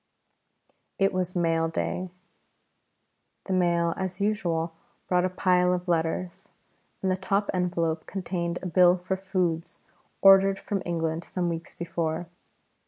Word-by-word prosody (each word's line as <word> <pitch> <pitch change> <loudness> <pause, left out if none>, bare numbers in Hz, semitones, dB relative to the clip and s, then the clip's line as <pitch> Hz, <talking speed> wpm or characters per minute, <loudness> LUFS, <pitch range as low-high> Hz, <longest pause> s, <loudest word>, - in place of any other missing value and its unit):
It 195 0 +2
was 185 0 -2
mail 165 -2 +2
day. 180 +3 -3 1.3
The 190 - -3
mail 170 -2 +2
as 190 0 -3
usual 175 -6 0 0.3
brought 180 0 +2
a - - +1
pile 180 -1 +2
of 180 +1 -6
letters, 170 +1 -1 0.5
and 190 - +2
the - - +2
top 195 +2 0
envelope 170 -3 -1
contained 175 -2 -3
a - - -5
bill 180 0 +5
for 185 +1 -2
foods 185 -4 -2 0.4
ordered 195 0 +7
from 200 -1 -3
England 165 -1 -1
some 175 -1 -2
weeks 165 0 -5
before. 165 0 -2
180 Hz, 130 wpm, -27 LUFS, 170-185 Hz, 1.3 s, ordered